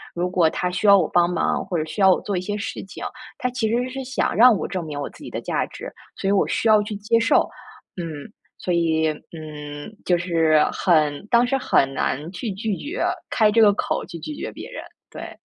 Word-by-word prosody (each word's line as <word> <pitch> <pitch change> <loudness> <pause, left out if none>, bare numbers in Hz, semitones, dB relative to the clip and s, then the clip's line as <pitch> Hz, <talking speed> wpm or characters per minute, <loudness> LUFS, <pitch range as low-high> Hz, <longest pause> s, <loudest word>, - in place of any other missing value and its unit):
如 175 +1 -1
果 180 -3 +3
他 180 - -2
需 180 +4 -3
要 200 - +9
我 175 -5 +2
帮 175 -1 +3
忙， 175 -2 0
或 190 -2 -4
者 155 - 0
需 180 +6 -5
要 190 -1 +7
我 - - -2
做 200 -2 -2
一 - - -1
些 205 +3 -3
事 225 +5 -5
情， 195 - -10 0.4
他 250 - 0
其 245 -3 -1
实 245 +3 0
是 265 +1 -5
想 260 0 -1
让 240 +1 +7
我 - - -3
证 185 -3 -3
明 150 -2 -5
我 140 - -4
自 - - -15
己 - - -7
的 - - -5
价 - - -1
值， - - -9 0.2
所 - - -4
以 - - +3
我 200 - +3
需 - - 0
要 215 -1 +6
去 210 0 -5
接 220 +3 +2
受。” 230 - +3 0.5
嗯， 165 +1 -6 0.3
所 180 - -3
以， 160 -2 +2 0.2
嗯， 150 +2 -8
就 180 - +3
是 165 -3 +3
很 155 -3 +1
当 240 0 +5
时 270 +2 +1
很 135 - +2
难 150 +6 -2
去 205 +4 -4
拒 205 0 -3
绝 310 +7 -4 0.3
开 215 -3 +3
这 225 +2 +4
个 205 -2 +6
口 - - -2
去 170 -2 -9
拒 300 - -6
绝 - - -5
别 - - -9
人， - - -7 0.3
对。 - - -9
185 Hz, 250 characters per minute, -22 LUFS, 165-220 Hz, 0.5 s, 要